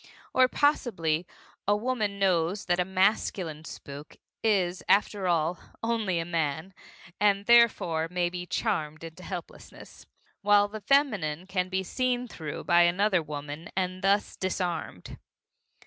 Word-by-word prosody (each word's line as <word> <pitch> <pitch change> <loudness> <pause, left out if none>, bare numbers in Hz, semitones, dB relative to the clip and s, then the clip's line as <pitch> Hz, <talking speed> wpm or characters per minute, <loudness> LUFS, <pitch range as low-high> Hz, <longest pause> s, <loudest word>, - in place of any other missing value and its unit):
Or 255 0 +5
possibly 185 - +1 0.4
a 205 - +4
woman 215 -3 -1
knows 185 0 +1
that 175 0 +1
a 180 - +2
masculine 185 -4 0
spook 145 -1 -10 0.3
is, 185 -5 +1
after 200 -1 +2
all, 170 0 +1 0.2
only 225 -6 0
a 165 - -1
man, 165 +1 -2 0.5
and 200 -1 +2
therefore 210 -9 +4
may 180 0 0
be 180 0 -6
charmed 155 -9 -2
into 165 +2 -9
helplessness, 180 -2 -9 0.3
while 205 0 +5
the 215 +1 -8
feminine 200 - +1
can 185 -1 -2
be 190 0 -1
seen 250 +4 -1
through 155 -9 -7
by 175 0 +4
another 185 +2 +3
woman 150 +1 -7
and 185 0 -1
thus 200 +1 +1
disarmed. 175 - -4
185 Hz, 130 wpm, -28 LUFS, 165-205 Hz, 0.5 s, Or